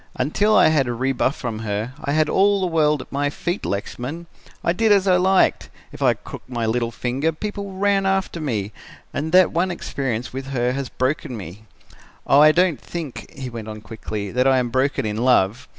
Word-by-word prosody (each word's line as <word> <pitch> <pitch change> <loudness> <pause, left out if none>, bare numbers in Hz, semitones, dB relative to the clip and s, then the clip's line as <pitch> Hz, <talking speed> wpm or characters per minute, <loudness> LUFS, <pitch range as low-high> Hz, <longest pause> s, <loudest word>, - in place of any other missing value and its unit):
Until 205 +11 +2
I - - +6
had 145 -5 +2
a 120 - -2
rebuff 130 +2 0
from 115 -4 -5
her, 110 +3 -3
I 140 - -1
had 155 0 +3
all 200 +4 +3
the 190 - 0
world 150 -5 +2
at - - -24
my 145 +1 0
feet, 175 +6 -3
Lexman. 125 +11 -4 0.4
I 170 - +2
did 220 +3 +2
as 200 -1 +4
I 180 -1 +5
liked. 190 +1 +2 0.2
If - - -12
I - - +4
crooked - - -11
my 120 -2 -2
little 115 +1 0
finger, 130 +7 -1
people 200 +3 -5
ran 195 0 +1
after 190 -3 -1
me 110 -8 -2 0.4
and 155 +3 -3
that 185 0 +6
one 180 +3 +1
experience 130 -9 -3
with 135 0 -5
her 125 -2 0
has 135 0 -3
broken 130 -2 -2
me. 100 +2 -10 0.6
Oh, 150 +2 +7
don't 175 -2 +2
think,' 160 -7 -7
he 130 -2 -5
went 115 -2 -7
on 110 -1 -7
quickly, 105 -2 -6
'that 125 +2 +2
I 135 -1 +4
am 125 -1 0
broken 130 0 0
in 105 0 -2
love. 120 -1 +2
135 Hz, 200 wpm, -22 LUFS, 120-170 Hz, 0.6 s, Oh